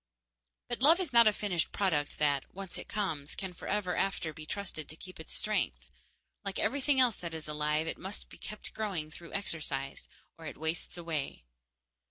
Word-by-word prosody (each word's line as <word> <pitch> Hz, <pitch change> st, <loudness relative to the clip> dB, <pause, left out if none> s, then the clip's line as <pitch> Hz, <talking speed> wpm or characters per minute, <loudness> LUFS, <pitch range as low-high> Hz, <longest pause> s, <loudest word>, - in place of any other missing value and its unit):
But 240 Hz, 0 st, -1 dB
love 320 Hz, +6 st, +8 dB
is 340 Hz, -9 st, -2 dB
not 235 Hz, -1 st, +9 dB
a -, -, +8 dB
finished 190 Hz, -5 st, 0 dB
product 155 Hz, -8 st, +1 dB
that, 145 Hz, -2 st, +2 dB
once 195 Hz, -1 st, -6 dB
it -, -, -7 dB
comes, 155 Hz, -9 st, -1 dB
can 190 Hz, -2 st, -4 dB
forever 190 Hz, +1 st, 0 dB
after 180 Hz, -5 st, +1 dB
be 155 Hz, +1 st, -8 dB
trusted 175 Hz, -6 st, -4 dB
to 155 Hz, -, -4 dB
keep 185 Hz, +2 st, -11 dB
its 160 Hz, -, -7 dB
strength. 215 Hz, 0 st, 0 dB, 0.5 s
Like -, -, -3 dB
everything 280 Hz, -1 st, +3 dB
else 245 Hz, -4 st, +6 dB
that 170 Hz, -2 st, -4 dB
is 160 Hz, -1 st, -5 dB
alive, 150 Hz, +1 st, +1 dB
it 165 Hz, -, -3 dB
must 190 Hz, +2 st, -5 dB
be -, -, -13 dB
kept 210 Hz, +1 st, -7 dB
growing 185 Hz, -8 st, -2 dB
through 170 Hz, +1 st, -10 dB
exercise, 150 Hz, -8 st, -1 dB, 0.3 s
or 160 Hz, -, -6 dB
it -, -, -6 dB
wastes 160 Hz, +3 st, -2 dB
away. 165 Hz, -, -2 dB
175 Hz, 185 wpm, -33 LUFS, 155-210 Hz, 0.5 s, not